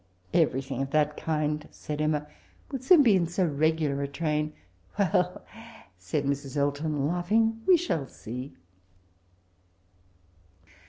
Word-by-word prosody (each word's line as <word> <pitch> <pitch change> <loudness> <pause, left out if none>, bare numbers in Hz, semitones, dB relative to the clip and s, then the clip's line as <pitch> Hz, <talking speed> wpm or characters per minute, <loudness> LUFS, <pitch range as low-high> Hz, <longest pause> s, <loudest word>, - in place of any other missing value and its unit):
"*But 170 - +4
everything 135 -3 -1
of 135 - -2
that 150 0 +2
kind,* 150 -1 -1
said 150 0 -5
Emma, 150 -1 0 0.2
* - - -32
wHl 270 -3 -4
soon 300 +3 +7
be 225 -6 +5
in 175 -3 +2
so 175 +2 0
regular 155 -2 +1
a 140 - -1
train 150 +1 -1 0.2
— 90 - -31
^ 200 - +5
•' 170 - -3
• - - -13
Well,' 180 0 0 0.5
said 90 +11 -3
Mrs. 140 0 -2
Elton, 145 0 0
laughing, 220 +8 +1
'we 370 -2 +7
shall 165 - -2
see.' 125 +5 -7
150 Hz, 155 wpm, -28 LUFS, 140-175 Hz, 0.5 s, soon